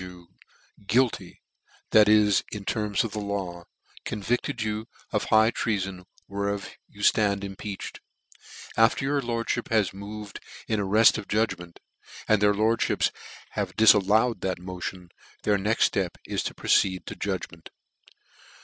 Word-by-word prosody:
you 90 -2 -11 0.6
guilty: 115 -5 0 0.5
that 105 -1 +6
is, 105 -2 +4
in 105 - -5
the - - -13
terms 105 +1 0
of 115 - -4
the 105 - -4
law, 95 -4 -4 0.4
con - - -4
vicled 120 +2 -1
you 110 +1 -3 0.2
of - - +1
the - - -6
high 110 +1 +5
treafori 95 -6 -2 0.2
whereof 100 0 -3 0.2
you 105 0 -10
ftand 100 -2 +3
Impeached; 100 +1 -6 0.8
after 115 +4 +3
your 140 +1 +1
lordlhip 120 -1 -2
has 110 -5 +2
moved 100 +1 -8 0.3
in 110 - 0
ar 100 - -1
r 105 +3 +1
eft 110 0 +6
of 105 - -9
judgment, 90 -6 -2 0.5
and 110 -2 +3
their 105 0 +4
lordfhips 110 +2 +1 0.4
have - - -3
difal 110 -2 +6
lov/ed 110 +2 +2
that 95 -1 -1
motion, 90 0 -7 0.3
their 105 -1 +2
next 105 +4 +1
(lep 95 -3 -1
is - - -2
to - - -4
proceed 95 -2 +2
to - - -7
judgment. 95 -4 -5
105 Hz, 155 wpm, -26 LUFS, 95-110 Hz, 0.8 s, that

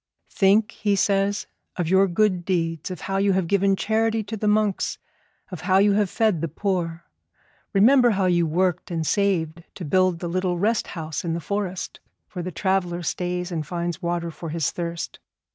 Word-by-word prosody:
'Think,' 210 +3 +3
he 205 -1 0
says, 200 +1 +1 0.3
'of 175 -3 -1
your 190 +3 +4
good 185 0 +1
deeds, 165 -2 -1
of 185 - -6
how 195 0 -2
you 195 0 +3
have 185 -1 +1
given 195 +2 +2
charity 220 +2 0
to 210 +2 -5
the 215 0 -2
monks, 210 -2 +1 0.5
of 180 - -6
how 185 +2 +3
you 205 +1 +5
have 205 -1 +2
fed 215 -7 +1
the 165 - -1
poor. 170 0 -2 0.7
Remember 245 +5 +5
how 195 - +2
you 175 -2 +2
worked 180 +2 0
and 165 -2 -2
saved 170 -4 0
to 180 - -6
build 185 +3 +2
the 175 - -5
little 180 +1 -1
rest 215 +5 +1
house 155 -1 -4
in 165 -2 -1
the - - -2
forest 190 +1 -4 0.3
where 180 - -4
the 180 +1 -4
traveller 180 -1 -1
stays 180 +1 -2
and 155 -4 -3
finds 175 +1 -3
water 170 -1 -2
for 165 +1 -7
his 160 -1 -1
thirst. 170 -1 -5
185 Hz, 185 wpm, -24 LUFS, 170-200 Hz, 0.7 s, you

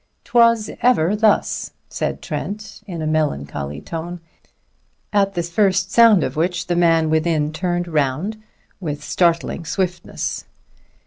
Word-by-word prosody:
"'Twas 230 -2 +3
ever 210 -6 +3
thus," 215 0 +1
said - - -3
Trent 205 0 -5
in 170 -4 -5
a - - -2
melancholy 75 - -2
tone, 170 - -6 0.9
at 195 -1 +2
the 175 - 0
first 190 +2 +1
sound 225 -6 +6
of - - -3
which 170 +2 0
the 175 - -1
man 165 -2 +3
within 155 -1 +1
turned 175 +1 -1
round 160 +8 -1 0.4
with 150 -6 -4
startling 170 0 +1
swiftness. 180 +1 -3
175 Hz, 125 wpm, -20 LUFS, 155-200 Hz, 0.9 s, sound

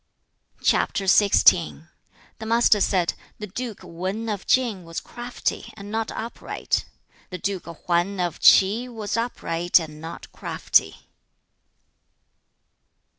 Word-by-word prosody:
CHAP. - - +2
XVI. 85 - +4 0.5
The 220 - -6
Master 230 -2 +4
said, 180 -3 +2 0.2
'The 210 - -6
duke 225 +2 -6
Wan 190 +7 -4
of 205 -3 -4
Tsin 235 -8 +2
was 165 0 -5
crafty 240 +1 -5
and 205 0 -9
not 225 0 -2
upright. 230 +1 -3 0.4
The 185 - -5
duke 190 +1 -3
Hwan 175 +3 -1
of 175 -1 -2
Ch'i 210 +6 +5
was 220 -4 -4
upright 175 -8 +1
and 155 -2 -8
not 165 +1 -9
crafty.' - - 0
195 Hz, 115 wpm, -24 LUFS, 175-225 Hz, 0.5 s, Ch'i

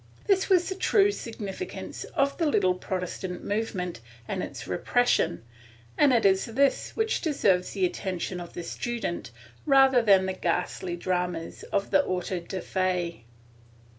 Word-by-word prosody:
This 390 -1 +2
was 360 -2 +4
the 380 - -2
true 400 +1 +3
significance 225 - -6
of 280 -2 +2
the 330 - +2
little 190 -10 +3
Protestant 180 0 -4
movement 195 - -2 0.3
and - - -2
its - - -6
repression, 85 - +1 0.5
and 290 -2 +5
it 235 -4 +3
is 190 -1 +4
this 270 +4 +1
which 445 0 0
deserves 195 - +1
the 190 -2 +1
attention 180 0 -3
of 175 -1 -8
the 175 - -5
student 210 - -4 0.3
rather 270 -3 +5
than 195 -4 +5
the 190 - -1
ghastly 175 0 -2
dramas 180 -1 -2
of 200 - 0
the 285 - +5
autos 180 -3 -3
de 190 -2 -4
fe. 180 -8 -1
190 Hz, 145 wpm, -27 LUFS, 180-270 Hz, 0.5 s, and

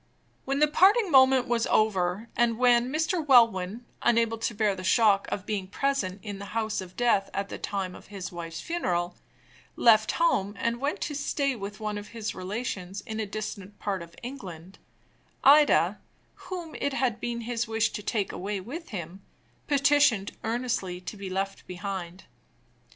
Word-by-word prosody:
When 275 +1 0
the 300 +1 +5
parting 385 +6 +4
moment 260 -2 +6
was 235 -1 +1
over, 195 0 +1
and 235 -1 +2
when 245 0 +4
Mr. 320 +3 0
Welwyn, 230 -5 +4 0.2
unable 230 -1 +2
to 225 - -2
bear 210 -1 +2
the 185 -1 -7
shock 200 0 +4
of 195 - -3
being 200 -3 -3
present 205 -5 -1
in 205 -2 -6
the 200 +2 -9
house 220 -3 -1
of 185 0 -11
death 235 -5 +2
at 200 0 -2
the - - -6
time 190 -2 -3
of - - -13
his 195 -3 -7
wife's 165 -1 -6
funeral, 180 - -1 0.6
left 220 -2 +5
home 205 - +1
and 235 +3 -1
went 285 +2 -1
to 295 - -2
stay 280 -1 -1
with 205 -1 -7
one 210 -1 -3
of 205 - -10
his 225 -2 -5
relations 195 -1 -4
in 220 -2 -6
a 215 - -2
distant 205 -1 -6
part 195 -3 -3
of 170 0 -11
England, 190 -9 -8 0.6
Ida, 295 +2 +5 0.5
whom 350 -4 -6
it 280 - 0
had 250 -5 0
been 235 -1 -3
his 235 0 -2
wish 225 0 +1
to - - -5
take 205 -1 -1
away 200 +1 -3
with 285 - -8
him, 185 -2 -6 0.5
petitioned 280 -7 +3
earnestly 225 -6 -2
to 180 - -7
be 200 -2 -6
left 195 +1 -3
behind. 185 -1 -6
215 Hz, 170 wpm, -27 LUFS, 195-250 Hz, 0.6 s, moment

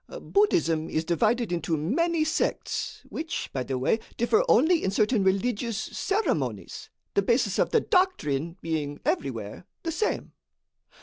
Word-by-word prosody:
"Buddhism 340 - +2
is 160 +1 -1
divided 220 +5 +1
into 165 -2 -1
many 315 - +1
sects 315 +1 -2
which, 320 +1 -4
by 130 - -1
the 130 +1 -2
way, 135 - +1 0.2
differ 235 -1 +3
only 320 +7 +4
in - - +1
certain 210 +2 +2
religious 215 +3 0
ceremonies, 140 - -2 0.2
the 200 - +3
basis 230 -1 +1
of - - +3
the - - +3
doctrine 170 - +1
being 150 -3 -2
everywhere 115 - -2 0.2
the 330 - -2
same. 390 +7 -1
200 Hz, 135 wpm, -27 LUFS, -, 0.2 s, only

